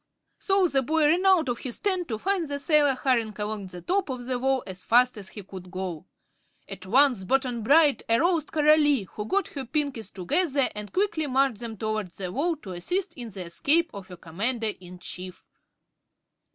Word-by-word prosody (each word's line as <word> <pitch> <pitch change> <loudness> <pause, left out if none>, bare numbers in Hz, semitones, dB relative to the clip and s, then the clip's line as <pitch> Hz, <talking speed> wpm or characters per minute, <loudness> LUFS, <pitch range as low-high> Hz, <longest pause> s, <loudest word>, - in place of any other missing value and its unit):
So 390 -2 +3
the 275 -4 +1
boy 310 +4 +1
ran 360 +5 +2
out 365 -6 +4
of 240 -1 -2
his 250 -3 -1
tent 375 -4 -1
to 220 - -3
find 375 - 0
the 285 0 -3
sailor 290 -2 +3
hurrying 235 -5 0
along 210 -1 -4
the 180 -1 -10
top 380 -2 0
of 250 -2 -5
the 250 -1 -2
wall 265 0 +1
as 190 0 -7
fast 250 +2 +4
as 200 -3 -8
he 205 - -9
could 185 -1 -10
go. 185 -4 -5 0.6
At 185 - -9
once 250 -2 +4
Button 250 +2 0
Bright 290 +5 +4
aroused 320 +6 +2
Coralie, 300 -5 +4
who 210 +3 -7
got 395 - 0
her 275 - -6
Pinkies 260 -6 -2
together 280 - 0
and 210 -1 -7
quickly 370 -6 0
marched 265 -4 +1
them 230 -2 -6
toward 215 -2 -2
the 185 -2 -5
wall 325 - 0
to 190 - -7
assist 340 - -2
in 245 -7 -7
the 190 -3 -7
escape 315 - +1
of 200 -3 -9
her 180 - -10
Commander 215 +7 -2
in 180 0 -11
Chief. 180 0 -7
255 Hz, 190 wpm, -26 LUFS, 205-310 Hz, 0.6 s, out